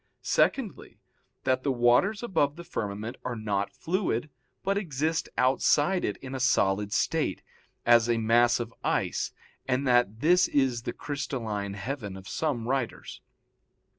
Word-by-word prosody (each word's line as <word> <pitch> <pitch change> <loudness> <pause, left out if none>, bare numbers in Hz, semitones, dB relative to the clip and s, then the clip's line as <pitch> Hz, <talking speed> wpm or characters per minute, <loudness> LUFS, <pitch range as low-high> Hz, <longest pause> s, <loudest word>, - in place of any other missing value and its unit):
Secondly, 245 -8 0 0.5
that 130 0 +1
the 140 - 0
waters 125 - +3
above 145 -11 +1
the 170 - -9
firmament 105 -4 -4
are 125 -1 -3
not 100 -3 -2
fluid, 160 - -1 0.3
but 195 +1 +1
exist 160 -4 -1
outside 145 +7 +3
it 105 - -1
in 130 0 -6
a 135 - -3
solid 105 -6 +2
state, - - 0 0.4
as 120 0 +5
a 120 - +3
mass 120 +2 +4
of 115 -1 -5
ice, - - 0 0.4
and 130 +1 0
that 120 -3 +2
this 180 +3 +5
is 130 -4 +1
the - - -4
crystalline 110 -9 -4
heaven 105 -3 -5
of 95 0 -11
some 125 -6 -2
writers. 130 -2 -3
125 Hz, 140 wpm, -28 LUFS, 115-145 Hz, 0.5 s, as